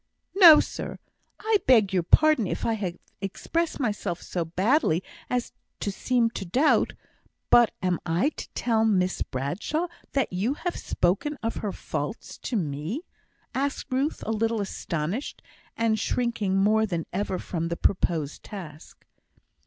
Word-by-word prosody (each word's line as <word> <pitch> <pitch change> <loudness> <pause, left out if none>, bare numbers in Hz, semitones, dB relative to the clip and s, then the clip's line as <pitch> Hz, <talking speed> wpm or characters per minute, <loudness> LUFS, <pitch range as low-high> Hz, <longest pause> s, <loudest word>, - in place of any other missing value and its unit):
"No, 340 -6 +10
sir. - - -4 0.4
I 440 0 +2
beg 220 -7 +5
your 185 - +3
pardon 300 - +4
if - - -3
I 230 - +2
have 190 -5 -3 0.2
expressed 325 - -2
myself 205 -8 -2
so 175 - -3
badly 185 - +2 0.3
as 245 -1 -1 0.3
to 200 - -2
seem 235 +2 +1
to 200 - -5
doubt. 255 - +2 0.6
But 240 -3 +7
am 180 -2 +1
I 175 - +1
to - - -9
tell 225 -2 +1
Miss 185 -4 +1
Bradshaw 175 - -2 0.3
that 270 -8 0
you 215 +10 0
have 355 +3 -3
spoken 205 +12 0
of 225 - -2
her 210 - -2
faults - - -5
to 245 - -4
me?" 160 - -2 0.5
asked 275 0 -2
Ruth, 270 +4 -1
a 220 - -1
little 225 +1 0
astonished, 190 - -3 0.3
and 225 -1 +2
shrinking 220 -5 0
more 215 +3 +3
than 170 -5 -2
ever 190 0 -1
from 165 -2 -3
the 170 0 -3
proposed 160 -6 0
task. 165 -7 -10
210 Hz, 145 wpm, -26 LUFS, 180-250 Hz, 0.6 s, No